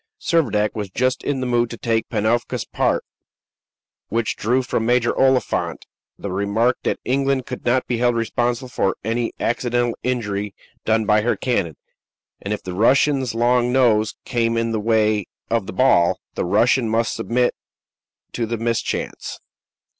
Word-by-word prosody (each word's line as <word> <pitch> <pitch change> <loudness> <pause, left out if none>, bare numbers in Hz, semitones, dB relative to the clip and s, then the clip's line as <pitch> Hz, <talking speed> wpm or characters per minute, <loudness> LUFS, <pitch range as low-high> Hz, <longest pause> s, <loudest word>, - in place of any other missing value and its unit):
Servadac 105 -11 +1
was 105 -3 -4
just 130 +6 0
in 140 -2 -1
the - - -1
mood 120 -1 +1
to 115 - -7
take 115 -1 -1
Panofka's 115 +2 0
part, - - 0 1.1
which 115 +1 -1
drew 125 +4 +1
from 115 - -1
Major 120 +1 +2
Oliphant 130 -3 +1 0.3
the 100 - -5
remark 100 +6 +1
that - - -1
England 135 0 +1
could 125 - -7
not 125 +2 +2
be 120 -2 -2
held 120 0 +2
responsible 120 +2 -1
for 95 -5 -1
any 115 +2 -1
accidental 120 0 0
injury 105 -5 -2 0.3
done 110 0 +2
by 105 0 +4
her 120 +3 +1
cannon, 95 - -1 0.6
and 100 - -5
if 105 - -3
the 90 - -5
Russian's 130 +4 +2
long 120 +1 +2
nose 115 -4 +3
came 115 -2 0
in 115 0 0
the 110 - -1
way 110 -2 +1 0.2
of 115 -4 0
the - - -6
ball, 95 -6 +3
the - - -2
Russian 115 +5 +3
must 115 +1 +1
submit 125 +1 0 0.8
to 115 -2 -2
the 115 +1 -2
mischance. 115 +1 -3
115 Hz, 155 wpm, -21 LUFS, 110-125 Hz, 1.1 s, by